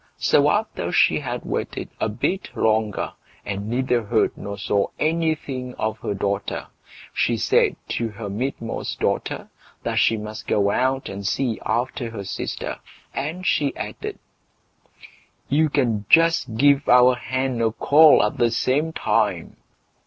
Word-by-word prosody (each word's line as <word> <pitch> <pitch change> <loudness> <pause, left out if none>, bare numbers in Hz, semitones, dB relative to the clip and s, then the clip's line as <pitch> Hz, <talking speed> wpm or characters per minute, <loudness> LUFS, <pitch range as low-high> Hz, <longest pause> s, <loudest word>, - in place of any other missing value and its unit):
So - - +3
after - - -1
she - - +4
had - - -5
waited - - -4
a - - 0
bit 150 - -3
longer, 110 -2 0 0.3
and 100 +1 -4
neither 125 0 +1
heard 110 +1 +1
nor 100 0 -6
saw 100 0 0
anything 155 -6 -1
of 110 0 -2
her 100 - -3
daughter, 100 0 -2 0.5
she - - +1
said - - +2
to 115 -1 -1
her 105 0 -7
midmost 115 +2 -4
daughter, - - -2 0.3
that - - 0
she 115 - +3
must 105 0 -7
go 100 -1 +2
out 130 +3 0
and 100 +1 -6
see 115 +4 -1
after 120 0 -1
her 110 -3 -6
sister, 95 - -4 0.3
and 160 +7 -4
she 145 -6 +1
added: - - -6 1.3
"You 155 +2 +3
can 115 -8 0
just 165 -8 +4
give 140 +2 +4
our 125 +1 +7
hen 125 0 -2
a 115 -1 +2
call 150 +5 +6
at 105 - -1
the 120 - +4
same 145 +7 0
time." - - 0
120 Hz, 145 wpm, -23 LUFS, 105-135 Hz, 1.3 s, our